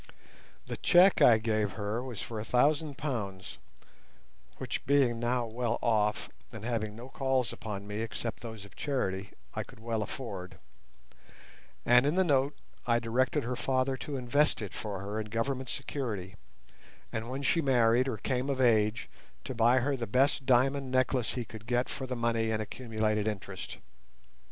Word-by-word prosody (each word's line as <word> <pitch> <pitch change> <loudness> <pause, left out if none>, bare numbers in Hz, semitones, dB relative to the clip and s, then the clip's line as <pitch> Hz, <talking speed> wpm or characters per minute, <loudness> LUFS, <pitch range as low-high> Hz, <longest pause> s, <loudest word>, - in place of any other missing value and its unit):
The - - -5
cheque 180 +2 +5
I 115 - +8
gave 110 -2 0
her 105 +3 -2
was 125 -5 -6
for 115 -2 -5
a - - -3
thousand 145 +4 +2
pounds 105 -10 -4 1.0
(which - - -4
being 135 -4 +3
now 120 +1 0
well 120 +1 -1
off, 105 -2 +1 0.2
and 110 0 -8
having 110 -3 -2
no 120 +3 -9
calls 130 -4 0
upon 100 -2 -6
me 105 +1 -4
except 115 0 -4
those 110 -4 -8
of 100 - -16
charity, 100 -9 -2 0.2
I - - -2
could - - -12
well 115 -1 -2
afford), 105 -4 -6 1.3
and 125 +3 +6
in 150 - +1
the 190 - +4
note 140 -3 +2 0.3
I 120 -1 +4
directed 120 +2 +1
her 125 +2 -2
father 130 +1 0
to 140 +1 -5
invest 140 +4 +2
it 105 -4 -5
for 100 -3 -5
her 100 +2 -3
in 110 - -4
Government 125 +4 -2
security, 105 -9 -4 0.8
and 115 +1 -4
when 135 +2 -4
she 135 +6 +3
married 125 -2 +4
or 125 -5 -2
came 130 +4 -1
of 135 -1 -1
age 110 -3 +3 0.4
to - - -5
buy 120 +2 +4
her 140 +3 +1
the 120 -3 -4
best 135 +4 +2
diamond 135 +2 +3
necklace 130 -3 +1
he 125 -2 -3
could 110 +1 -11
get 120 +1 +1
for 130 - -5
the 125 - -3
money 115 -1 +1
and 110 -1 0
accumulated 110 -2 -1
interest. 100 -3 -5
120 Hz, 170 wpm, -30 LUFS, 110-130 Hz, 1.3 s, I